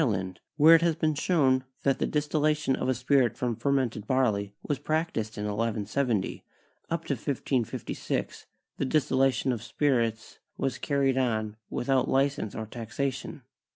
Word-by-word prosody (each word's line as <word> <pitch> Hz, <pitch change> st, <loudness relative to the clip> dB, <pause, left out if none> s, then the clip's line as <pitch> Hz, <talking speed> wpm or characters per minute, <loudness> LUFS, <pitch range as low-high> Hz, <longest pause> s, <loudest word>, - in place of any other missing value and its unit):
land, 95 Hz, -7 st, -1 dB, 0.2 s
where 155 Hz, +2 st, +8 dB
it 165 Hz, -, +7 dB
has 170 Hz, -2 st, +2 dB
been 155 Hz, -1 st, +1 dB
shown 140 Hz, -5 st, +2 dB, 0.2 s
that 135 Hz, -1 st, +2 dB
the -, -, +1 dB
distillation 150 Hz, -1 st, +1 dB
of -, -, -2 dB
a -, -, +4 dB
spirit 125 Hz, -1 st, +2 dB
from 120 Hz, -2 st, -1 dB
fermented 120 Hz, -3 st, 0 dB
barley 110 Hz, -7 st, +1 dB
was 145 Hz, -3 st, -2 dB
practiced 155 Hz, -8 st, -2 dB
in 105 Hz, -, -3 dB
1170, 110 Hz, +1 st, -1 dB, 0.5 s
up 165 Hz, 0 st, -2 dB
to -, -, 0 dB
1556 130 Hz, -2 st, -3 dB, 0.3 s
the -, -, 0 dB
distillation 135 Hz, -2 st, +2 dB
of 120 Hz, -3 st, -3 dB
spirits 115 Hz, -4 st, -1 dB, 0.2 s
was 135 Hz, -2 st, -2 dB
carried 135 Hz, -2 st, +1 dB
on 110 Hz, -4 st, 0 dB
without 130 Hz, +1 st, +1 dB
li 135 Hz, +1 st, +4 dB
cense 135 Hz, -7 st, -6 dB
or 110 Hz, -, -4 dB
taxation. 120 Hz, +4 st, -4 dB
130 Hz, 150 wpm, -28 LUFS, 115-145 Hz, 0.5 s, where